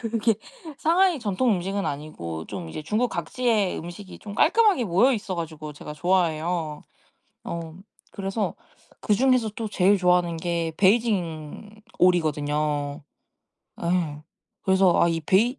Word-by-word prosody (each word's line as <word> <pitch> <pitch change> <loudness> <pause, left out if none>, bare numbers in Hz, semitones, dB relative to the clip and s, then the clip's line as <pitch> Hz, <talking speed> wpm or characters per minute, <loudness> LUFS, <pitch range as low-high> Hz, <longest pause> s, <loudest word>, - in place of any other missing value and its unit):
그게 230 -1 +1 0.4
상하이 350 +1 +3
전통 225 +3 +1
음식은 195 +3 -2
아니고 85 - -5
좀 90 -5 -6
이제 155 - -6
중국 215 +10 0
각지의 210 +3 0
음식이 175 +4 -9
좀 205 -1 -8
깔끔하게 390 - +4
모여있어 205 +1 +2
가지고 155 -2 -6
제가 150 - -8
좋아해요. 165 -1 0 0.6
어 165 -1 -5 0.4
그래서 195 +2 -2 0.5
그중에서 245 +1 +2
또 225 -2 -3
제일 200 +1 +3
좋아하는 180 -2 +2
게 170 -1 -2
베이징 200 -2 0 0.2
오리거든요. 150 -3 +1 0.7
아 170 - -4
예. 155 -5 -1 0.4
그래서 190 -1 +4
아 170 - +4
이 165 -1 0
베이 225 - +2
180 Hz, 290 characters per minute, -25 LUFS, 160-215 Hz, 0.7 s, 깔끔하게